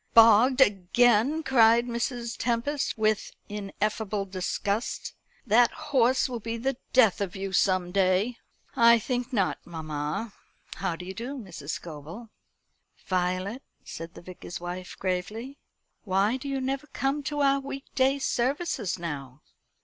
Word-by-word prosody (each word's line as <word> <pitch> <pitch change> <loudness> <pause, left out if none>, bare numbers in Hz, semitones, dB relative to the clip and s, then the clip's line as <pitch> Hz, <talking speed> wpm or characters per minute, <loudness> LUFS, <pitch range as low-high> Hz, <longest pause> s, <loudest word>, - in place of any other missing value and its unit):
"Bogged 230 +4 +7
again!" 240 - +3
cried 235 -3 +5
Mrs. 235 -1 -3
Tempest, 245 +4 -1
with 215 -1 +1 0.2
ineffable 205 0 -2
disgust. 200 +3 -2 0.3
"That 235 +1 +5
horse 265 -5 +2
will 245 -2 -4
be 230 +1 -4
the 265 +2 -1
death 225 -7 +4
of 195 -3 -3
you 195 0 -4
some 185 -2 +2
day." 195 +5 +2 0.4
"I 235 0 +7
think 245 +2 -3
not, 200 -7 0
mamma. 155 +5 -4 0.4
How 190 -3 -1
do 180 - -9
you 190 - -6
do, 245 +7 -5
Mrs. 185 - -9
Scobel?" 165 +8 -8 0.8
"Violet," 185 +6 -1 0.2
said 165 0 -8
the - - -11
Vicar's 180 -1 -8
wife 180 +1 -6
gravely, 210 +9 -3 0.4
"why 200 +3 +2
do 265 +2 -5
you 275 -1 -1
never 270 +2 -3
come 270 +2 -1
to 290 +1 -2
our 275 0 +4
week 275 0 -7
day 265 +1 +3
services 265 - -1
now?" 145 -5 -6
225 Hz, 135 wpm, -27 LUFS, 185-255 Hz, 0.8 s, Bogged